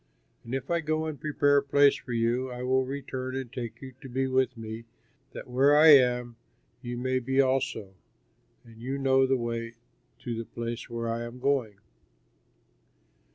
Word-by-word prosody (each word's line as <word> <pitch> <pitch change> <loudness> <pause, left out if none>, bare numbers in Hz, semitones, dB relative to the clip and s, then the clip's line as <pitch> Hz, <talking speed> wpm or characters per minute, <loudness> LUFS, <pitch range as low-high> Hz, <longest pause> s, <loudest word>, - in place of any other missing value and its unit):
And 120 +3 -4
if 135 +5 -4
I 170 -1 +1
go 155 0 -1
and 155 -4 -6
prepare 145 -1 +2
a - - +4
place 140 0 +4
for 125 - -9
you, 120 +3 0
I 125 0 -6
will 130 +1 +2
return 130 -1 -5
and 130 -2 -5
take 115 0 -6
you 130 -1 -9
to 135 - -9
be 130 +2 -1
with 130 -1 +1
me 110 +1 -7 0.5
that - - -8
where 135 +4 +4
I 160 +1 +8
am, 125 -4 +5 0.4
you 120 -1 -5
may 130 +1 0
be 135 +2 -1
also; 130 -7 0 0.7
and 115 -1 -16
you 135 +3 -3
know 135 -1 +3
the 135 0 +2
way 115 -1 -4 0.5
to 120 -2 -4
the 115 0 -5
place 115 +1 -5
where 115 0 -4
I 115 +1 -2
am 120 +1 -7
going." 125 -7 0
130 Hz, 180 wpm, -28 LUFS, 120-135 Hz, 0.7 s, I